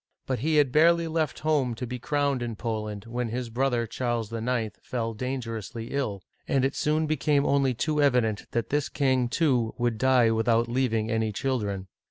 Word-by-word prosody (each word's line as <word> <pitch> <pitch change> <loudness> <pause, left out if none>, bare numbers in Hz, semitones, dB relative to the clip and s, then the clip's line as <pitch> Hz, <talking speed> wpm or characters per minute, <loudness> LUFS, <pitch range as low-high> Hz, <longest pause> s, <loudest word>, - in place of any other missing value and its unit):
But 130 -3 -2
he 155 +6 +1
had 145 -4 +4
barely 170 +3 +4
left 160 -2 -1
home 145 -6 +1
to 125 - -4
be 125 +1 -5
crowned 140 0 0
in 120 -2 -3
Poland, 105 -2 -4
when 120 0 -3
his 120 0 -4
brother 120 -1 +1
Charles 115 -1 -2
IX. 115 -2 -1
fell 115 -2 -3
dangerously 115 -2 -5
ill, 110 -9 -2 0.2
and 135 -1 +2
it 135 - 0
soon 155 +1 +1
became 150 -1 +1
only 135 -2 +2
too 150 +5 0
evident 125 -7 +2
that 115 -2 -2
this 145 0 0
king, 130 -3 +1
too, 125 -7 +1
would 120 -2 0
die 125 -3 +4
without 115 +1 +2
leaving 120 -3 0
any. 110 -1 0
children. 105 -5 -2
125 Hz, 180 wpm, -27 LUFS, 115-140 Hz, 0.2 s, had